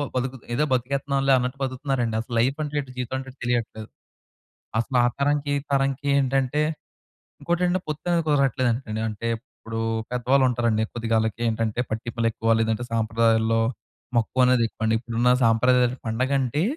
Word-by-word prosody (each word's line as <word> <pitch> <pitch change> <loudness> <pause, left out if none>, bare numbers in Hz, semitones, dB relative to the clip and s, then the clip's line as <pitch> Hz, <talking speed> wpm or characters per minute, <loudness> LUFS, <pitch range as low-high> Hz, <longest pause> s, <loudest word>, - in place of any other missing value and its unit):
బతుకు 130 +1 -2 0.2
ఏదో 150 +3 +2
బతికేత్తున్నాంలే 135 +2 +1
అన్నట్టు 125 +2 -2
బతుకుతున్నారండి. 130 -3 -1
అసలు 120 0 -6
లైఫంటే 145 +4 0
ఎటో 130 -2 -11
జీవితం 125 +1 -3
అంటే 135 0 -8
ఎటో 130 - -25
తెలియట్లేదు. 115 -3 -2 0.9
అసల 125 +2 -2
ఆ - - +4
తరంకి 145 0 +1
ఈ - - -8
తరంకి 135 0 0
ఏంటంటే 135 +2 +1 0.8
ఇంకోటేంటంటే 180 +1 +1
పొత్తనేది 165 +2 0
కుదరట్లేదండి 130 -5 +1
అంటే, 110 +2 -5 0.3
ఇప్పుడు 115 0 -6 0.3
పెద్దవాళ్ళు 130 +2 +2
ఉంటారండి. 115 -3 +1
కొద్దిగాలకేటంటే 115 0 -1
పట్టింపులేక్కువ 115 0 0
లేదంటే 110 +1 0
సాంప్రదాయాల్లో 115 0 +2 0.6
మక్కువ 125 +3 +2
అనేది 125 -2 +4
ఎక్కువండి. 110 0 0
ఇప్పుడున్న 120 +1 0 0.2
సాంప్రదాయాల 125 +2 +3
పండగంటే 130 +5 0
125 Hz, 125 wpm, -24 LUFS, 115-135 Hz, 0.9 s, ఆ